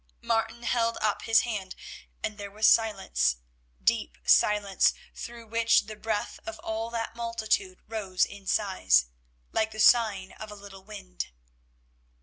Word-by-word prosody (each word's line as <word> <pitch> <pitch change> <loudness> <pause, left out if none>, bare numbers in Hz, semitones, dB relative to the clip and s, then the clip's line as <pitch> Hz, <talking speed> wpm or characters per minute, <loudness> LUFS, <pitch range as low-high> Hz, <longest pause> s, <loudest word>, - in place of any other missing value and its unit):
Martin 230 0 -1
held 230 0 +1
up 215 -2 0
his 225 0 +4
hand, 205 -6 -4 0.5
and 210 -1 -3
there 200 0 -6
was 215 +2 -1
silence, 190 - +3 0.5
deep 60 0 +1
silence, 205 -2 +4 0.2
through 235 -1 -8
which 230 +1 +3
the 215 0 -8
breath 215 0 -3
of 220 0 -7
all 220 +1 -3
that 230 -1 -4
multitude 220 -5 -1
rose 200 -5 0
in 200 -1 -12
sighs, 185 - +3 0.5
like 220 - +1
the 215 - -10
sighing 215 -4 +4
of 215 - -9
a - - -8
little 200 -1 -12
wind. - - -7
215 Hz, 140 wpm, -28 LUFS, 195-225 Hz, 0.5 s, his